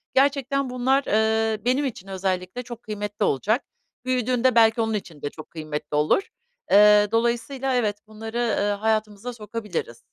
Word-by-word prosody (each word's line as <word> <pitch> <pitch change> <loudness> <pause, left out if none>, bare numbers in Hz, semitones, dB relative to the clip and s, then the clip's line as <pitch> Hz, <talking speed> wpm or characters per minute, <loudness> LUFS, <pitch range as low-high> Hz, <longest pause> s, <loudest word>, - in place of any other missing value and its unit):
Gerçekten 275 0 +2
bunlar, 260 +2 +1
ııı, 220 0 +1
benim 260 +4 +2
için 205 -7 -5
özellikle 190 +3 -3
çok 240 -1 -9
kıymetli 210 -1 -3
olacak. 215 - +1 0.4
Büyüdüğünde 255 0 +1
belki 225 0 +5
onun 225 0 0
için 170 -8 -5
de 145 - -2
çok 155 +1 -12
kıymetli 155 -2 -5
olur. 150 - +3 0.5
Eee, 210 0 +7
dolayısıyla 240 +3 0
evet, 210 -4 0
bunları, 220 +2 -6 0.2
ııı, 205 0 +1
hayatımıza 215 +2 -1
sokabiliriz. 210 - -5
220 Hz, 140 wpm, -24 LUFS, 205-250 Hz, 0.5 s, Eee